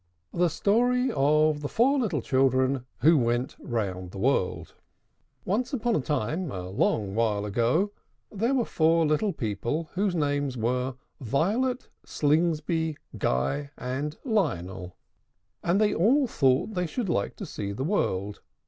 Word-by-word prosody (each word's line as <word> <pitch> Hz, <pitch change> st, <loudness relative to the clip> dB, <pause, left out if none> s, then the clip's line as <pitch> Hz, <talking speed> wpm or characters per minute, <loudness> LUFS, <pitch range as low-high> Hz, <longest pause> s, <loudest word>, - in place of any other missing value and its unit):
THE 175 Hz, 0 st, +2 dB
STORY 245 Hz, -, +2 dB
OF 150 Hz, +2 st, +3 dB
THE 145 Hz, -, -3 dB
FOUR 270 Hz, +5 st, +3 dB
LITTLE 175 Hz, -, -1 dB
CHILDREN 130 Hz, -1 st, +2 dB
WHO 160 Hz, +2 st, +6 dB
WENT 120 Hz, +1 st, 0 dB
ROUND 95 Hz, -6 st, -3 dB
THE 95 Hz, -, -10 dB
WORLD. 105 Hz, -3 st, 0 dB, 0.7 s
Once 240 Hz, +9 st, -1 dB
upon 240 Hz, -2 st, 0 dB
a -, -, +1 dB
time, 150 Hz, +6 st, -2 dB
a 90 Hz, -3 st, -5 dB
long 100 Hz, +1 st, 0 dB
while 105 Hz, -2 st, 0 dB
ago, 120 Hz, -, +1 dB, 0.4 s
there 230 Hz, +6 st, 0 dB
were 245 Hz, -3 st, +1 dB
four 165 Hz, +1 st, +3 dB
little 155 Hz, +7 st, +1 dB
people 120 Hz, -, -3 dB
whose 190 Hz, -1 st, 0 dB
names 145 Hz, -4 st, 0 dB
were 125 Hz, +3 st, -1 dB, 0.2 s
VIOLET, 205 Hz, -, 0 dB, 0.2 s
SLINGSBY, 160 Hz, +1 st, 0 dB, 0.2 s
GUY, 70 Hz, -, 0 dB
and 140 Hz, +5 st, -4 dB
LIONEL; 95 Hz, -, -1 dB, 0.7 s
and 175 Hz, +4 st, +2 dB
they 210 Hz, -1 st, +3 dB
all 255 Hz, -, +3 dB
thought 140 Hz, -, +1 dB
they 180 Hz, -2 st, -1 dB
should 230 Hz, +6 st, -3 dB
like 100 Hz, -, -1 dB
to -, -, -6 dB
see 100 Hz, -1 st, -5 dB
the 105 Hz, +7 st, -4 dB
world. 105 Hz, -, -1 dB
150 Hz, 140 wpm, -27 LUFS, 120-190 Hz, 0.7 s, WHO